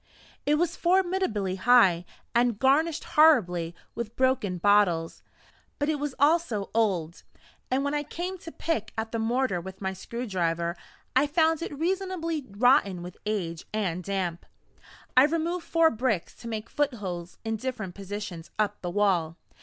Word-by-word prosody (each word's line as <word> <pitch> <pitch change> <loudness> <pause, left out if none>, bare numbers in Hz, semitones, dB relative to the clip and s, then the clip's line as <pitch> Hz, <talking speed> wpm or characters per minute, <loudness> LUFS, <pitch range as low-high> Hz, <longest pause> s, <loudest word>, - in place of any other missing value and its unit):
It 295 - +4
was 340 +2 0
formidably 350 - +1
high, 195 -7 +5 0.3
and 235 -2 +2
garnished 290 +6 +2
horribly 180 - +4 0.2
with 235 -1 -5
broken 260 -8 +1
bottles; 175 -4 +2 0.6
but 290 +1 0
it 305 -2 0
was 290 -2 -3
also 290 -9 +2
old, 185 -7 0 0.5
and 260 +2 +1
when 285 +1 -1
I 295 - +1
came 355 +5 -5
to 330 - -9
pick 230 -12 -2
at 220 0 -3
the 230 - -2
mortar 230 -5 0
with 190 +2 -9
my 190 -1 -2
screw 235 +6 -6
driver, 170 -4 -1 0.4
I 270 +3 +4
found 320 +1 +2
it 300 -4 -5
reasonably 335 -3 -2
rotten 200 -4 +3
with 180 0 -9
age 175 -6 -3
and 180 -4 -1
damp. 185 -3 -3 0.7
I 255 +2 +8
removed 330 +3 -1
four 330 -1 +4
bricks 220 -6 -1
to 235 - -9
make 220 -1 -4
footholes 195 -13 -3
in 225 0 -1
different 220 -6 -4
positions 195 -3 -6
up 215 -1 0
the 175 - -3
wall. 175 -4 +1
225 Hz, 155 wpm, -27 LUFS, 190-295 Hz, 0.7 s, I